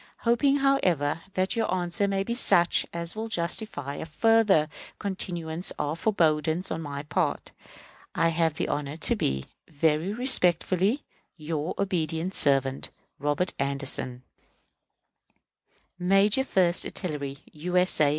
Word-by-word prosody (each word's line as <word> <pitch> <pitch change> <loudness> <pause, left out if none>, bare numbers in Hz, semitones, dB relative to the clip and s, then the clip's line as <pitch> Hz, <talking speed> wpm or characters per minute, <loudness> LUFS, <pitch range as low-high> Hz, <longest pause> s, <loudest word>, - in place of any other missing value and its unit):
Hoping, 245 +4 +3
however, 180 - +1
that 185 +4 0
your 225 -4 0
answer 180 +2 0
may 195 0 0
be 235 - -3
such 175 -7 +4
as 170 +1 -2
will 220 +1 -4
justify 170 - -2
a - - -6
further 195 -1 +3 0.3
continuance 175 -4 -2
of 150 +3 -3
forbearance 160 -3 +1
on 160 - -3
my 145 -2 -5
part, 145 0 -2 0.6
I 165 - +3
have 165 -1 +1
the - - -2
honor 145 +1 -3
to - - +3
be, 65 0 -1 0.2
Very 160 +3 +1
respectfully, 205 - +2 0.3
your 155 0 -4
obedient 175 -2 -1
servant, 135 -4 +2 0.3
ROBERT 145 +6 0
ANDERSON, 135 -2 -2 1.8
_Major 195 +7 +3
First 180 -8 +2
Artillery 145 -6 -3
U. 175 +4 -3
S. 180 -3 +3
A. 145 - +5
170 Hz, 125 wpm, -26 LUFS, 150-195 Hz, 1.8 s, A